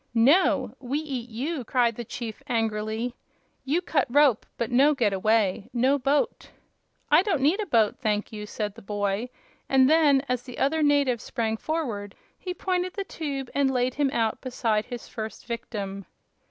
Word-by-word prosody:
"No! 265 Hz, -, +4 dB
We 265 Hz, +2 st, -2 dB
eat 265 Hz, -6 st, -4 dB
you," 265 Hz, +6 st, -3 dB
cried 235 Hz, -1 st, +1 dB
the 240 Hz, -, -5 dB
chief, 230 Hz, -1 st, -6 dB
angrily. 225 Hz, 0 st, -1 dB, 0.5 s
"You 305 Hz, +7 st, 0 dB
cut 285 Hz, -6 st, +1 dB
rope, 275 Hz, -3 st, +4 dB
but 235 Hz, -1 st, -2 dB
no 280 Hz, +5 st, +5 dB
get 220 Hz, -6 st, +1 dB
away; 205 Hz, 0 st, +1 dB
no 260 Hz, +4 st, +2 dB
boat!" 275 Hz, +2 st, 0 dB, 0.6 s
"I 305 Hz, +3 st, +7 dB
don't 380 Hz, -6 st, 0 dB
need 325 Hz, +9 st, +3 dB
a 420 Hz, -, -2 dB
boat, 225 Hz, -8 st, +2 dB
thank 210 Hz, -2 st, -1 dB
you," 210 Hz, -1 st, -6 dB
said 210 Hz, -1 st, -3 dB
the 230 Hz, -, -13 dB
boy; 205 Hz, +3 st, -2 dB, 0.4 s
and 265 Hz, -1 st, +5 dB
then, 295 Hz, -3 st, +4 dB
as 250 Hz, -1 st, -1 dB
the 250 Hz, -1 st, -10 dB
other 310 Hz, +4 st, +1 dB
native 285 Hz, -5 st, +3 dB
sprang 225 Hz, -1 st, -2 dB
forward, 225 Hz, -8 st, -3 dB, 0.2 s
he 365 Hz, -, -6 dB
pointed 365 Hz, 0 st, -1 dB
the 400 Hz, -, -2 dB
tube 280 Hz, -8 st, -5 dB
and 280 Hz, -1 st, +2 dB
laid 250 Hz, -1 st, +1 dB
him 285 Hz, 0 st, +1 dB
out 225 Hz, -4 st, -1 dB
beside 225 Hz, -4 st, 0 dB
his 245 Hz, -2 st, -7 dB
first 220 Hz, -1 st, -7 dB
victim. 200 Hz, -5 st, -5 dB
250 Hz, 170 wpm, -26 LUFS, 220-285 Hz, 0.6 s, I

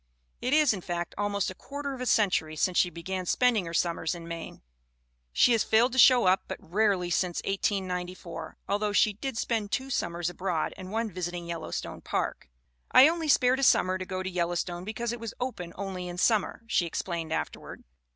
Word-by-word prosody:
It 255 Hz, -, -1 dB
is, 305 Hz, -6 st, +5 dB
in 195 Hz, -, -5 dB
fact, 175 Hz, 0 st, -4 dB
almost 200 Hz, -2 st, -1 dB
a -, -, -7 dB
quarter 280 Hz, +7 st, -6 dB
of 255 Hz, -, -7 dB
a 250 Hz, -, -2 dB
century 180 Hz, -9 st, +2 dB
since 180 Hz, +3 st, 0 dB
she 180 Hz, -, +4 dB
began 180 Hz, +2 st, -5 dB
spending 230 Hz, -6 st, +2 dB
her 165 Hz, -, -6 dB
summers 170 Hz, -1 st, 0 dB
in 170 Hz, -1 st, -9 dB
Maine. 170 Hz, -, -7 dB, 0.7 s
She 70 Hz, -, +4 dB
has 225 Hz, -3 st, +3 dB
failed 230 Hz, +4 st, +3 dB
to 260 Hz, -, -1 dB
show 250 Hz, -2 st, +7 dB
up 185 Hz, +1 st, +4 dB
but -, -, -5 dB
rarely 190 Hz, -1 st, +1 dB
since 175 Hz, 0 st, 0 dB
1894, 180 Hz, -4 st, -3 dB
although 205 Hz, +1 st, 0 dB
she 210 Hz, 0 st, +4 dB
did 265 Hz, +4 st, -5 dB
spend 220 Hz, -4 st, -1 dB
two 270 Hz, 0 st, -2 dB
summers 170 Hz, -6 st, -1 dB
abroad 175 Hz, -2 st, -2 dB
and 185 Hz, 0 st, -9 dB
one 225 Hz, 0 st, -1 dB
visiting 175 Hz, -1 st, -4 dB
Yellowstone 170 Hz, -1 st, -5 dB
Park. -, -, -3 dB, 0.4 s
"I 265 Hz, -, +9 dB
only 325 Hz, 0 st, -1 dB
spared 260 Hz, -2 st, +4 dB
a -, -, -1 dB
summer 185 Hz, -6 st, +4 dB
to -, -, -3 dB
go 185 Hz, -1 st, -3 dB
to -, -, -4 dB
Yellowstone 175 Hz, 0 st, -2 dB
because 225 Hz, +2 st, -3 dB
it 240 Hz, -, -6 dB
was 230 Hz, -2 st, -6 dB
open 240 Hz, -9 st, -4 dB
only 190 Hz, -2 st, -5 dB
in 175 Hz, 0 st, -6 dB
summer," 220 Hz, +3 st, +1 dB
she 190 Hz, -7 st, +1 dB
explained 165 Hz, -1 st, -4 dB
afterward. 75 Hz, -, -4 dB
190 Hz, 195 wpm, -28 LUFS, 175-230 Hz, 0.7 s, I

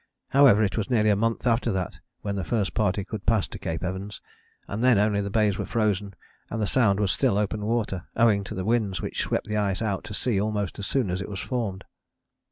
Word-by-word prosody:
However, 130 Hz, -6 st, +6 dB
it 100 Hz, -, -1 dB
was 105 Hz, -, -3 dB
nearly 110 Hz, -4 st, +3 dB
a -, -, +4 dB
month 115 Hz, +4 st, -1 dB
after 115 Hz, 0 st, +2 dB
that 95 Hz, -2 st, -3 dB, 0.2 s
when 100 Hz, -1 st, -3 dB
the 95 Hz, -, -2 dB
first 105 Hz, +2 st, -1 dB
party 100 Hz, -2 st, +1 dB
could 105 Hz, -2 st, -7 dB
pass 110 Hz, -4 st, +3 dB
to -, -, -8 dB
Cape 80 Hz, +2 st, -4 dB
Evans, 95 Hz, +3 st, -4 dB, 0.5 s
and 105 Hz, +4 st, -3 dB
then 125 Hz, -4 st, +5 dB
only 105 Hz, 0 st, +2 dB
the 100 Hz, -, -3 dB
Bays 105 Hz, -1 st, +1 dB
were -, -, -1 dB
frozen 105 Hz, -3 st, 0 dB, 0.3 s
and 115 Hz, -, -3 dB
the 105 Hz, -, +1 dB
Sound 100 Hz, -3 st, +3 dB
was 100 Hz, -3 st, +2 dB
still 100 Hz, -, +2 dB
open 105 Hz, 0 st, -1 dB
water, 105 Hz, -5 st, -1 dB
owing 110 Hz, -3 st, +4 dB
to -, -, -6 dB
the 95 Hz, -, -3 dB
winds 110 Hz, -5 st, +1 dB
which -, -, -3 dB
swept -, -, -1 dB
the 105 Hz, 0 st, -2 dB
ice 100 Hz, -2 st, 0 dB
out 105 Hz, -4 st, -2 dB
to 105 Hz, -, -6 dB
sea 110 Hz, -5 st, 0 dB
almost 105 Hz, -3 st, -2 dB
as 100 Hz, -, -3 dB
soon 125 Hz, -9 st, 0 dB
as 90 Hz, +2 st, -2 dB
it 95 Hz, -, -6 dB
was 100 Hz, -2 st, -5 dB
formed. 105 Hz, -6 st, -3 dB
105 Hz, 235 wpm, -26 LUFS, 100-110 Hz, 0.5 s, However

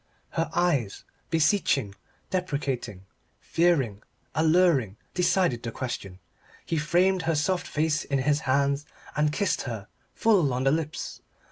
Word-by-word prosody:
Her 165 Hz, -1 st, -1 dB
eyes, 145 Hz, -, +1 dB, 0.3 s
beseeching, 160 Hz, -, +2 dB, 0.4 s
deprecating, 135 Hz, -, -2 dB, 0.3 s
fearing, 140 Hz, -, +1 dB, 0.3 s
alluring, 160 Hz, -, +3 dB, 0.2 s
decided 180 Hz, -8 st, +2 dB
the 115 Hz, -, -4 dB
question. 110 Hz, -7 st, -5 dB, 0.5 s
He 165 Hz, -, -1 dB
framed 180 Hz, +5 st, +2 dB
her 165 Hz, -, +2 dB
soft 175 Hz, +5 st, 0 dB
face 155 Hz, 0 st, 0 dB
in 140 Hz, -, -1 dB
his 145 Hz, +2 st, +2 dB
hands 140 Hz, +1 st, +1 dB, 0.3 s
and 150 Hz, 0 st, +2 dB
kissed 200 Hz, +5 st, 0 dB
her, 105 Hz, -4 st, -6 dB, 0.3 s
full 180 Hz, -, +3 dB
on 130 Hz, -, -1 dB
the 135 Hz, -, +4 dB
lips. 155 Hz, 0 st, -3 dB
150 Hz, 125 wpm, -27 LUFS, 130-175 Hz, 0.5 s, the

